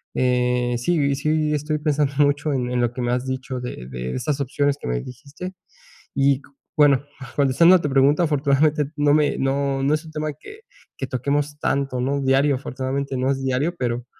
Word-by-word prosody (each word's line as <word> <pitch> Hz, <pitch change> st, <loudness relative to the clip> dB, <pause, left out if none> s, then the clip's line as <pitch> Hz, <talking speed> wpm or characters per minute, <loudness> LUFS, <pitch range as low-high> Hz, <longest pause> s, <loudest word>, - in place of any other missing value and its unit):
eh, 125 Hz, -1 st, +1 dB
sí, 140 Hz, +1 st, +1 dB
sí 155 Hz, +1 st, 0 dB
estoy 150 Hz, +1 st, -1 dB
pensando 150 Hz, -2 st, 0 dB
mucho 145 Hz, +1 st, +2 dB
en 125 Hz, -2 st, -1 dB
en 125 Hz, -, 0 dB
lo 120 Hz, -1 st, 0 dB
que 125 Hz, -, -5 dB
me 120 Hz, 0 st, 0 dB
has 125 Hz, +1 st, -1 dB
dicho 130 Hz, 0 st, -4 dB
de 65 Hz, -, -7 dB
de 65 Hz, 0 st, -4 dB
esas 135 Hz, +3 st, -2 dB
opciones 140 Hz, +1 st, 0 dB
que -, -, -5 dB
me -, -, -1 dB
dijiste. 145 Hz, -, -9 dB, 0.6 s
Y 140 Hz, 0 st, +3 dB
cu 145 Hz, -, -21 dB, 0.3 s
bueno, 145 Hz, -2 st, +4 dB, 0.3 s
contestando 145 Hz, +6 st, +5 dB
a 180 Hz, -, +3 dB
tu 150 Hz, -, -1 dB
pregunta, 140 Hz, +3 st, +4 dB
afortunadamente, 150 Hz, 0 st, +2 dB
no 145 Hz, 0 st, +3 dB
me 150 Hz, -1 st, +2 dB
no 135 Hz, 0 st, 0 dB
no 140 Hz, +2 st, +2 dB
es 155 Hz, +2 st, -6 dB
un 160 Hz, -, -11 dB
tema 155 Hz, 0 st, -3 dB
que 420 Hz, +1 st, -12 dB, 0.4 s
que 135 Hz, -, -4 dB
toquemos 145 Hz, +3 st, -1 dB
tanto, 135 Hz, -4 st, -1 dB
¿no?, 140 Hz, +2 st, 0 dB
diario, 135 Hz, +1 st, +3 dB
afortunadamente, 135 Hz, +1 st, -3 dB
no 130 Hz, +2 st, +1 dB
es 135 Hz, -1 st, -2 dB
diario, 135 Hz, +6 st, 0 dB
pero 120 Hz, -2 st, -2 dB
140 Hz, 195 wpm, -22 LUFS, 130-150 Hz, 0.6 s, contestando